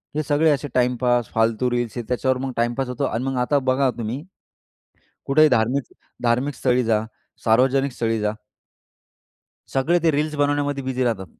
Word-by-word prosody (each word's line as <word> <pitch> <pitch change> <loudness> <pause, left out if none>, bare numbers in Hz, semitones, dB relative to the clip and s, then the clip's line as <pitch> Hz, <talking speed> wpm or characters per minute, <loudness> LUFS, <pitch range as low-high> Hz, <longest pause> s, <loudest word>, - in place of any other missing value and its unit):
हे 155 - 0
सगळे 150 +2 +2
असे 145 0 -1
टाइमपास, 125 -1 +1
फालतू 115 +2 +1
रील्स, 120 -1 -2
हे 120 - -3
त्याच्यावर 130 +1 +1
मग 135 - -3
टाईमपास 120 +3 0
होतो. 125 - -3
आणि 115 +3 -2
मग 135 -1 -2
आता 140 +3 +2
बघा 135 +1 +2
तुम्ही. 120 +7 -4 1.0
कुठेही 155 +2 +5
धार्मिक, 125 +2 0 0.3
धार्मिक 125 +4 +1
स्थळी 125 -1 +1
जा, 110 -1 +2 0.4
सार्वजनिक 130 +4 +3
स्थळी 115 -1 -1
जा. 105 0 0 1.4
सगळे 155 +6 +2
ते, 165 - +4
रील्स 150 +1 -1
बनवण्यामध्ये 145 -1 0
बिझी 130 -1 -1
राहतात. 110 -6 -1
130 Hz, 160 wpm, -22 LUFS, 120-140 Hz, 1.4 s, कुठेही